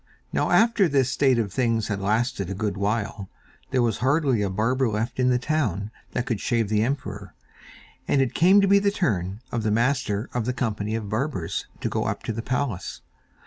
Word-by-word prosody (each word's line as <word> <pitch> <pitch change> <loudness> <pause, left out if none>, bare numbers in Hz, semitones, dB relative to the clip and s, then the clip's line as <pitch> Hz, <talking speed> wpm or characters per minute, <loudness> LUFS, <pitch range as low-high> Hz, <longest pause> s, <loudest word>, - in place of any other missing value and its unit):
Now - - +1
after 225 -5 +4
this 135 -3 +2
state 135 -2 +3
of 105 -5 -1
things 115 -4 +1
had 100 -2 -3
lasted 110 -1 0
a 100 - -3
good 105 -1 -2
while, 100 0 -2 0.4
there 130 -2 +2
was 115 -3 0
hardly 135 -3 +2
a 100 - 0
barber 115 +6 +1
left 110 +4 -3
in 125 0 +3
the 125 - +3
town 115 - -1 0.2
that 120 - -1
could 115 -4 -2
shave 115 -4 0
the 105 -1 +2
emperor, 105 -6 -3 0.7
and 140 - +2
it 135 -3 +1
came 190 +4 +5
to 195 - +3
be 200 +1 +6
the 200 0 +2
turn 105 - -1
of 120 - -1
the 110 - 0
Master 115 -1 0
of 120 -3 -1
the 125 - -1
Company 110 -3 -2
of 110 -2 -4
Barbers 110 - -2
to - - -1
go - - -1
up - - -3
to 115 - -3
the 115 - -4
palace. 120 -4 -3
115 Hz, 205 wpm, -25 LUFS, 105-130 Hz, 0.7 s, be